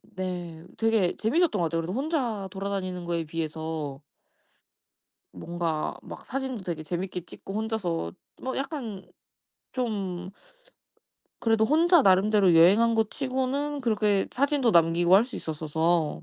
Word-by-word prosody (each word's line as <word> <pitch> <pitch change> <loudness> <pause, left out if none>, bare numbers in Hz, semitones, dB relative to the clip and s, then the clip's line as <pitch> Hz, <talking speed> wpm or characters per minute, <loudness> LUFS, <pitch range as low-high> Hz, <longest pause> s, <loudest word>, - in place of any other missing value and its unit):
네. 175 -3 -5
되게 225 -5 +2
재미있었던 285 - +2
것 - - +1
같아요. 165 +1 -1
그래도 170 +3 -4
혼자 250 - -1
돌아다니는 190 -2 -4
거에 170 -1 -1
비해서 155 -2 -4 1.3
뭔가 170 -2 -3
막 - - -10
사진도 260 -5 -3
되게 170 -3 -4
재미있게 180 +2 -4
찍고 180 +3 -10
혼자서 205 - -2 0.3
뭐 260 - -3
약간 255 - -5 0.7
좀 195 -7 -3 1.1
그래도 225 -1 +2
혼자 330 +5 +5
나름대로 195 -1 +4
여행한 200 +8 +6
것 220 -1 +1
치고는 275 +2 -2
그렇게 210 -5 +1
사진도 275 -2 +2
남기고 170 0 +4
할 205 +4 +6
수 255 - -8
있었어서 160 +1 -1
195 Hz, 290 characters per minute, -27 LUFS, 170-235 Hz, 1.3 s, 여행한